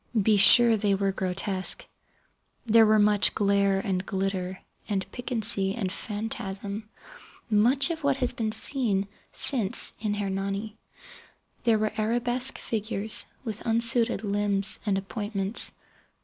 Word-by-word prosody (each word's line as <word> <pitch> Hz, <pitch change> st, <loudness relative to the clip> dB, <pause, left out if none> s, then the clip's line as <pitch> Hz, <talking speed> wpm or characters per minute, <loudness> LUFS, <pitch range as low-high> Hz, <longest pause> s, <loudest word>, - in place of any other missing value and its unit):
Be 210 Hz, +1 st, +2 dB
sure 235 Hz, +3 st, +7 dB
they 200 Hz, -1 st, 0 dB
were 195 Hz, 0 st, -1 dB
grotesque. 190 Hz, 0 st, 0 dB, 0.8 s
There 225 Hz, -1 st, +5 dB
were 215 Hz, 0 st, +4 dB
much 205 Hz, -1 st, +3 dB
glare 200 Hz, -1 st, +1 dB
and 190 Hz, -2 st, -2 dB
glitter 190 Hz, -1 st, -4 dB, 0.3 s
and 195 Hz, -2 st, -2 dB
piquancy 220 Hz, -5 st, -1 dB
and 195 Hz, -6 st, -3 dB
phantasm—much 205 Hz, -1 st, -5 dB, 1.1 s
of 325 Hz, -1 st, -6 dB
what 280 Hz, -1 st, +1 dB
has 250 Hz, -2 st, +1 dB
been 220 Hz, -2 st, -3 dB
since 220 Hz, -3 st, 0 dB, 0.3 s
seen 225 Hz, -8 st, +4 dB
in 210 Hz, -2 st, -2 dB
"Hernani". 200 Hz, +1 st, -4 dB, 0.9 s
There 230 Hz, -2 st, +3 dB
were 215 Hz, 0 st, -1 dB
arabesque 240 Hz, +4 st, +1 dB
figures 215 Hz, -1 st, -1 dB, 0.2 s
with 220 Hz, -3 st, -6 dB
unsuited 230 Hz, -1 st, +1 dB
limbs 205 Hz, 0 st, -1 dB
and 195 Hz, -2 st, +1 dB
appointments. 200 Hz, +1 st, -4 dB
210 Hz, 120 wpm, -26 LUFS, 195-225 Hz, 1.1 s, sure